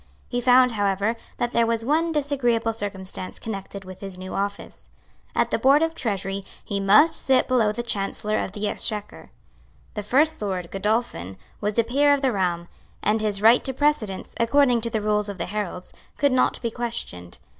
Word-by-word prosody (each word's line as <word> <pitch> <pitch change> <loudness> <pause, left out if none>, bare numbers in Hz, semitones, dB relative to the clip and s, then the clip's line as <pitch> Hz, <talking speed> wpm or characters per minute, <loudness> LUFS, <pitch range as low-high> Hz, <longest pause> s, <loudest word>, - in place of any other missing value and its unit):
He 245 -1 -1
found, 250 0 +5
however, 205 +1 0 0.2
that 240 0 -2
there 235 -1 +3
was 230 -1 -1
one 320 +5 +1
disagreeable 260 -7 0
circumstance 190 -3 -5
connected 200 -2 -7
with 185 0 -10
his 195 -2 -7
new 185 0 -7
office. 200 +1 -5 0.5
At - - +1
the - - +1
Board 280 +4 +5
of 325 0 0
Treasury 195 - -3 0.2
he 200 - -2
must 210 +12 +5
sit 265 -1 +2
below 235 -5 +3
the 240 +3 -4
Chancellor 210 -1 -1
of 190 - -4
the 210 0 -2
Exchequer. 210 0 -2 0.6
The 210 - -4
First 295 +8 +2
Lord, 185 -4 -3
Godolphin, 195 - -2 0.2
was 210 +1 -2
a 230 - +5
peer 285 +5 +3
of 280 - -5
the 265 -2 +2
realm; 175 -4 -1 0.4
and 215 +2 +2
his 210 -1 0
right 230 +3 +6
to 265 - -1
precedence, 265 -10 0
according 245 0 +3
to 230 - -1
the 220 -1 -2
rules 210 0 0
of 200 - -6
the 170 - -3
heralds, 185 -2 -5 0.2
could 285 -2 +3
not 255 - +2
be 230 - -1
questioned. 225 - -4
215 Hz, 185 wpm, -24 LUFS, 195-250 Hz, 0.6 s, right